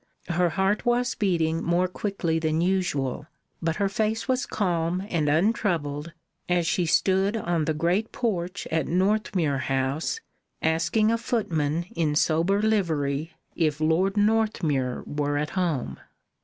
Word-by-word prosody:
Her 175 0 +2
heart 195 +4 0
was 240 0 +1
beating 165 -4 0
more 175 +2 +2
quickly 180 -4 -2
than 160 0 0
usual, 165 -7 0 0.3
but 165 -1 0
her 200 - +1
face 220 +4 -1
was 260 0 0
calm 175 -1 -1
and 155 -4 +1
untroubled, 165 -4 0 0.4
as 175 -1 +2
she 170 +1 +1
stood 190 +5 +2
on 170 -6 0
the 160 -1 0
great 175 +8 0
porch 185 -5 -2
at 160 -1 0
Northmuir 185 -6 +1
House, 135 - -1 0.4
asking 165 +7 +2
a 230 - +1
footman 170 -10 -1
in 155 -3 +1
sober 170 +7 +2
livery 160 -8 0 0.2
if 155 -3 0
Lord 175 +6 +2
Northmuir 205 - +1
were 145 0 -1
at 150 0 -2
home. 160 - -1
170 Hz, 135 wpm, -26 LUFS, 155-200 Hz, 0.4 s, Her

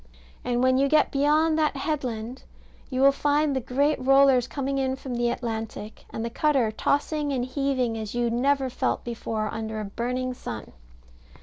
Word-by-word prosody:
And 245 0 0
when 260 0 +4
you 275 - +3
get 305 0 +3
beyond 305 +3 +2
that 305 -2 +1
headland, 255 -5 -3 0.5
you 255 0 -1
will 275 +1 +7
find 290 +1 +1
the - - +1
great 280 +5 +1
rollers 270 -2 +5
coming 275 -1 -2
in 265 -1 0
from 265 -1 -7
the 240 0 +1
Atlantic, 225 -2 -5
and 225 - -4
the 235 - -4
cutter 265 -5 +2
tossing 290 +5 0
and 250 -3 -1
heaving 255 -3 -1
as 215 +1 -6
you 240 -1 +1
never 270 +3 +1
felt 250 - -1
before, 225 -2 -3
under 220 0 -4
a 215 - -4
burning 250 +5 -3
sun. 110 - -7
260 Hz, 175 wpm, -26 LUFS, 235-280 Hz, 0.5 s, will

